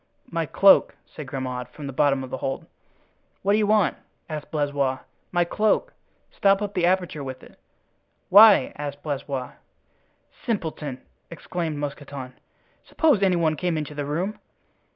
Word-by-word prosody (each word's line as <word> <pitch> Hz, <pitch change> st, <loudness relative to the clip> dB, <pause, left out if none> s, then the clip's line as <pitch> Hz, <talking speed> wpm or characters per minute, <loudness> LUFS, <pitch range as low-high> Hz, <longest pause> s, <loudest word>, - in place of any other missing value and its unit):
"My 165 Hz, -2 st, -1 dB
cloak," 195 Hz, +5 st, +5 dB
said 150 Hz, -3 st, -10 dB
Grimaud, 130 Hz, -2 st, -4 dB
from 145 Hz, +3 st, -10 dB
the 135 Hz, -, -5 dB
bottom 135 Hz, 0 st, +2 dB
of 130 Hz, -, -9 dB
the -, -, -3 dB
hold. 135 Hz, +1 st, -4 dB, 0.8 s
"What 200 Hz, -, +2 dB
do 210 Hz, -, +4 dB
you 210 Hz, -, +2 dB
want?" 210 Hz, -3 st, +3 dB, 0.3 s
asked 155 Hz, -2 st, -6 dB
Blaisois. 145 Hz, -3 st, 0 dB, 0.3 s
"My 175 Hz, -1 st, +2 dB
cloak—stop 210 Hz, -, 0 dB
up 205 Hz, -1 st, -4 dB
the 175 Hz, -1 st, +2 dB
aperture 180 Hz, -5 st, 0 dB
with 130 Hz, -1 st, -7 dB
it." -, -, -17 dB, 0.7 s
"Why?" 205 Hz, +1 st, +7 dB
asked 145 Hz, -1 st, -6 dB
Blaisois. 140 Hz, -3 st, -4 dB, 0.9 s
"Simpleton!" 160 Hz, -, -3 dB, 0.3 s
exclaimed 170 Hz, -1 st, -4 dB
Mousqueton; 140 Hz, -2 st, -6 dB, 0.5 s
"suppose 300 Hz, -11 st, +2 dB
any 190 Hz, -2 st, +3 dB
one 160 Hz, -2 st, +1 dB
came 175 Hz, 0 st, -1 dB
into 150 Hz, -1 st, -4 dB
the 145 Hz, -1 st, -4 dB
room." 180 Hz, +8 st, -2 dB
155 Hz, 145 wpm, -24 LUFS, 140-190 Hz, 0.9 s, Why